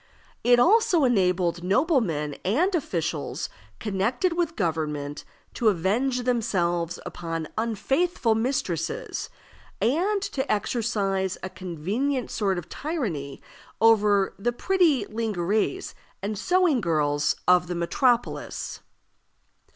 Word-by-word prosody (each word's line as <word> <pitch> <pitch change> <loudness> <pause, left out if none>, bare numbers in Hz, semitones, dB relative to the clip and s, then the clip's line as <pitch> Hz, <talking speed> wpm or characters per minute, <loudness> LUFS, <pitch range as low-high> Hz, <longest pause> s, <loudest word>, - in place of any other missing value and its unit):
It 245 0 +6
also 360 - +4
enabled 180 -7 +2
noblemen 190 - +1
and 315 - +2
officials 165 - -2 0.3
connected 225 - 0
with 335 -1 -1
government 150 -5 -2 0.3
to 235 - 0
avenge 230 +8 0
themselves 175 -8 0
upon 165 -2 -4
unfaithful 230 - +1
mistresses, 225 - -2 0.5
and 360 - +2
to 285 -9 -2
exercise 205 -4 0
a 190 - -4
convenient 205 - -2
sort 195 -4 0
of 175 -1 -5
tyranny 190 - -4 0.4
over 210 -3 +4
the 240 +4 +1
pretty 315 - +2
_ling_ères 215 - -1 0.3
and 210 +2 -2
sewing 350 - +2
girls 150 -4 +1
of 180 0 +5
the 175 - -3
metropolis. 240 +8 0
215 Hz, 100 wpm, -25 LUFS, 175-265 Hz, 0.5 s, It